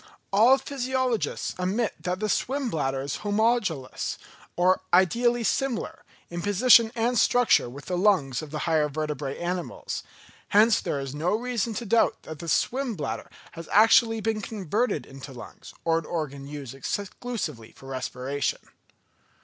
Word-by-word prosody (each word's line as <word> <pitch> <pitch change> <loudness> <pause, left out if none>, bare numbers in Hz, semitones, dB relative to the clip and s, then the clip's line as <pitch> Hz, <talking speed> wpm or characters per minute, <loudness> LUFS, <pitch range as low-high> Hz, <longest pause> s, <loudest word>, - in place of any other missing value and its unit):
All 235 +7 +6
physiologists 260 -3 -2
admit 200 +5 0
that 180 +1 -2
the 215 - -1
swim 260 +3 -1
bladder 135 -4 -1
is 140 0 -3
homologous, 205 - 0 0.4
or 185 +1 +3
"ideally 235 +7 +3
similar" 270 +6 -1 0.2
in 175 0 -5
position 220 +4 +5
and 235 0 +1
structure 245 - +4
with 140 +4 -10
the 180 -1 -2
lungs 175 -11 +2
of 155 - -8
the 155 - -5
higher 155 -3 +2
vertebrate 150 -2 -3
animals: 175 +1 -4 0.5
hence 215 +1 +5
there 140 - -2
is 135 -1 -5
no 165 +7 0
reason 235 -1 -2
to 235 - -4
doubt 230 +2 +2
that 155 -2 -8
the 170 - -5
swim 255 +3 0
bladder 155 - -4 0.2
has 165 -1 -10
actually 225 +1 +5
been 220 0 -1
converted 205 - -1
into 135 0 -10
lungs, 120 - -11
or 165 0 +3
an 165 - -10
organ 140 -4 -4
used 145 -4 -7
exclusively 155 - -4
for - - -17
respiration. 135 +1 -3
185 Hz, 150 wpm, -26 LUFS, 150-230 Hz, 0.5 s, All